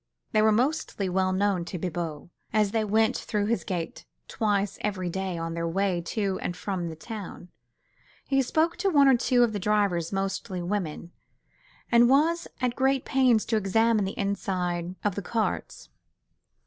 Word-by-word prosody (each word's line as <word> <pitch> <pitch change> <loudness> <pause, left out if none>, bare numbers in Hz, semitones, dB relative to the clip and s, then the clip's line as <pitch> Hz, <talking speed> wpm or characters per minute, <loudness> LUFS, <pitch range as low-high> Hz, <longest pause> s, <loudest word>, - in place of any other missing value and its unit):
They 215 - +3
were 220 0 +5
mostly 245 -4 0
well 185 +1 +1
known 190 -1 +1
to 180 - -5
Bibot, 170 -3 -4 0.2
as 210 -2 +2
they 225 0 +1
went 220 +1 +2
through 210 -1 -1
his 210 -5 0
gate 175 -3 -4 0.2
twice 205 -3 -1
every 185 -4 -2
day 190 -1 -3
on 165 0 -3
their 170 0 -2
way 185 0 0
to 195 -3 -1
and 175 - -3
from 175 0 -3
the 160 - -7
town. 180 +1 -8 0.8
He 270 -1 +2
spoke 320 +6 +1
to 395 - +1
one 285 -5 +5
or 265 - +6
two 245 +1 +3
of 230 -2 +1
their 205 - -2
drivers—mostly 195 -1 -1
women—and 205 - -2
was 325 +5 +3
at 250 -2 0
great 265 0 +1
pains 255 -5 +3
to 225 - +1
examine 215 +1 +2
the 190 - -5
inside 185 -3 -2
of 205 - +1
the 200 - -4
carts. 220 +3 -3
200 Hz, 160 wpm, -27 LUFS, 180-230 Hz, 0.8 s, or